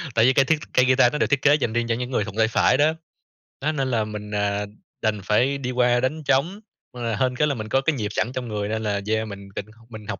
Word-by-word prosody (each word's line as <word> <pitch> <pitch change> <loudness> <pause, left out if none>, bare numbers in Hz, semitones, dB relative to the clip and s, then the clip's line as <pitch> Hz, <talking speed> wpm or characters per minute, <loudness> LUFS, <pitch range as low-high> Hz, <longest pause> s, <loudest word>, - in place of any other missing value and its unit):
tại 115 +1 +5
vì 130 - +5
cây 135 0 +4
thiết 155 +2 +2
cây 125 - +4
guitar 130 -1 +4
nó - - 0
được - - +2
thiết 145 -2 +1
kế 145 0 +5
dành 120 -6 -1
riêng 120 0 0
cho 115 - +1
những 125 +2 -4
người 105 - +1
thuận 105 -1 -8
tay 110 0 +4
phải 115 - +3
đó. 155 +2 +3 0.7
Nó 155 +3 0
nên 135 -3 -2
là 110 -2 +1
mình, 105 -1 -7
à, 105 0 -1 0.4
đành 105 -2 0
phải 125 +7 +2
đi 125 -2 -4
qua 125 -1 +2
đánh 150 +5 -2
trống, 165 +10 +1 0.3
ờ, 115 -3 -3
hên 125 +3 0
cái 150 +3 +2
là 140 - 0
mình 110 -1 -6
có 135 - +2
cái 150 +1 0
nhịp 105 -4 -3
sẵn 120 - -1
trong 125 -2 -4
người 105 -1 -3
nên 110 0 -2
là, 100 -1 -1
yeah, 110 0 0
mình 100 -1 -9
định 100 - -4 0.2
mình 110 -2 -10
học 95 - -4
120 Hz, 285 wpm, -23 LUFS, 105-135 Hz, 0.7 s, tại